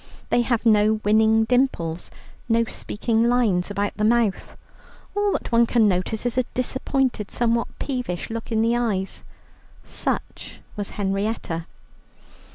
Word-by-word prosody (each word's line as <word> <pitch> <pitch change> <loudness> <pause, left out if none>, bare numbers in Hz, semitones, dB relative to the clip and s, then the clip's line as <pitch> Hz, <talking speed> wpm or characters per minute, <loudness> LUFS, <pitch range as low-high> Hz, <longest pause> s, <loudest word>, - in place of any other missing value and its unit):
They 240 - +4
have 240 -1 0
no 215 -1 +5
winning 220 +1 +4
dimples, 220 -10 0 0.4
no 230 0 +4
speaking 230 +1 0
lines 215 -8 +2
about 205 0 -2
the 210 - -1
mouth. 225 -2 +1 0.6
All 410 -1 +1
that - - -3
one 235 0 +4
can 225 -3 +4
notice 200 +4 -1
is 245 +1 +1
a - - +2
disappointed, 255 -3 -1
somewhat 235 -1 +1
peevish 245 -10 -3
look 230 0 -5
in 220 0 +2
the 230 +1 +2
eyes. 210 -6 -2 0.6
Such - - -4 0.2
was 205 -2 -4
Henrietta. 195 -4 -2
225 Hz, 135 wpm, -23 LUFS, 205-240 Hz, 0.6 s, no